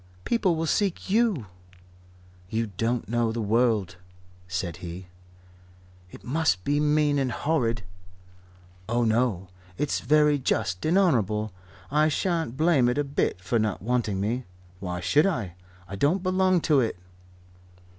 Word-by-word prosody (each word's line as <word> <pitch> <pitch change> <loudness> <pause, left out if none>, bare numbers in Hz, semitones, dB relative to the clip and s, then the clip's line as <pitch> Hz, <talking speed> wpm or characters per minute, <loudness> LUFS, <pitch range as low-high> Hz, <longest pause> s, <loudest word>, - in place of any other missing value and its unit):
"People 205 -7 +2
will 160 +1 -1
seek 190 +2 -1
you." 215 - +2 1.0
"You 110 0 -2
don't 115 +3 -1
know 120 0 0
the 115 - -4
world," 110 -4 +1 0.5
said 90 -2 -3
he. 90 +1 -8 1.0
"It - - -13
must 130 - 0
be 145 +1 +1
mean 150 -1 +2
and 130 -2 0
horrid." 120 -8 0 1.1
"Oh, 120 +1 +1
no. 110 -5 +1 0.3
It's 150 - 0
very 150 +2 +3
just 100 - -1
and 170 +4 +3
honourable. 110 - +1 0.4
I 150 +1 +3
shan't 160 -5 -1
blame 155 -6 +3
it 125 - -1
a 145 - +2
bit 140 -9 -1
for 115 +5 0
not 105 -4 -1
wanting 115 -4 0
me. 115 +6 -2 0.3
Why 90 -2 -4
should 150 - +3
I? 115 - -2 0.3
I 100 - -6
don't 170 - +1
belong 185 -1 +2
to 150 -4 +3
it." 115 -7 0
125 Hz, 140 wpm, -26 LUFS, 105-155 Hz, 1.1 s, very